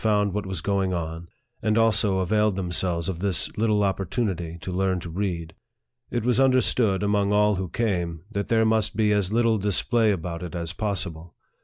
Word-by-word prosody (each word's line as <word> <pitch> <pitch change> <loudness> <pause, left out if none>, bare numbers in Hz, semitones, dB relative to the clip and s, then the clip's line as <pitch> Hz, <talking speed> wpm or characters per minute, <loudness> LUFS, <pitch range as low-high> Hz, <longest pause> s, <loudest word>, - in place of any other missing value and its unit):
81 105 -3 +2
what 105 -1 -3
was 95 -4 -4
going 95 0 0
on, 85 0 -5 0.3
and 110 0 +1
also 110 -4 +3
availed 105 +2 +2
themselves 90 -2 -1
of 90 -3 -3
this 95 -2 0
little 105 -1 +2
opportunity 95 -3 -2
to 95 - -5
learn 95 0 0
to 85 - -7
read. 85 -3 -3 0.6
It 120 -2 -2
was 125 0 +2
understood, 125 -6 +3
among 100 0 +1
all 105 -1 +3
who 95 -1 -3
came, 85 -6 -2
that 100 -2 -2
there 110 -1 +3
must 110 -1 +1
be 105 -1 +2
as 100 -2 0
little 115 -1 +2
dis 100 -1 0
play 115 -3 +2
about 85 -2 -4
it 90 -1 -6
as 85 0 -3
possible. 85 -5 -3
100 Hz, 185 wpm, -25 LUFS, 90-110 Hz, 0.6 s, also